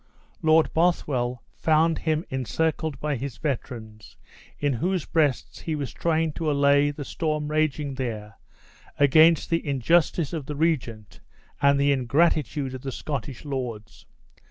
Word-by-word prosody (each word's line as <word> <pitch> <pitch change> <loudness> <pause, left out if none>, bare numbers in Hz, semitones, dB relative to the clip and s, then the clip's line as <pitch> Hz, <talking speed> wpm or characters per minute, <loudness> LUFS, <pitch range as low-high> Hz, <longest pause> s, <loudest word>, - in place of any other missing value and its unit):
Lord 160 0 +4
Bothwell 130 -8 0
found 160 +1 +2
him 160 +1 -1
encircled 155 +4 -1
by 150 -2 -1
his 135 -1 -6
veterans, 115 -7 -5 0.4
in 145 -1 0
whose 180 +7 -1
breasts 150 -6 0
he 160 - -3
was 145 -3 -4
trying 160 -2 0
to 160 -1 -2
allay 140 0 +4
the 145 -1 -6
storm 150 -1 -2
raging 150 -2 0
there 110 -5 -5 0.6
against 155 +4 +5
the 165 - +1
injustice 155 +3 +1
of 155 -5 -4
the 150 - -4
regent 130 - -2 0.4
and 140 0 +4
the 140 0 +3
ingratitude 140 +1 +1
of 130 - -7
the 135 - -5
Scottish 140 0 -5
lords. 120 -6 -6
145 Hz, 135 wpm, -25 LUFS, 130-160 Hz, 0.6 s, against